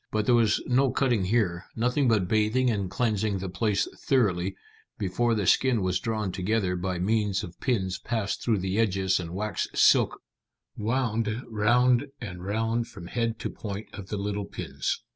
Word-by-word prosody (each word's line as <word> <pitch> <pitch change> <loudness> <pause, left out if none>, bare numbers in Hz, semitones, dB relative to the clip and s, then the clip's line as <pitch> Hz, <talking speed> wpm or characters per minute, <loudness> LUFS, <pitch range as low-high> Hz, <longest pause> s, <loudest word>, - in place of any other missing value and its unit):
But 110 -1 0
there 125 - +4
was 115 -3 +3
no 130 +2 +3
cutting 120 -7 +1
here, 90 -4 0
nothing 125 +4 +1
but 105 -6 +2
bathing 110 +5 +2
and 100 -4 -2
cleansing 105 -2 0
the 95 0 -4
place 100 +1 0
thoroughly, 95 -8 +1 0.4
before 115 +4 0
the 105 -3 -1
skin 120 0 +3
was 90 0 +1
drawn 110 -4 -2
together 95 0 0
by 90 0 -2
means 105 +1 0
of 85 - -9
pins 95 -8 -1
passed 110 -4 -2
through 110 -5 +1
the 95 +3 -1
edges 95 -4 +2
and 85 -2 -5
waxed 105 +4 -3
silk - - +4 0.6
wound 115 0 -1
round 120 +4 +3
and 90 -7 -7
round 115 +4 -1
from 95 -6 -11
head 115 +4 -1
to - - -3
point 105 0 -6
of 100 -2 -8
the 105 - -2
little 100 0 -2
pins. 65 -8 -4
105 Hz, 170 wpm, -27 LUFS, 95-115 Hz, 0.6 s, there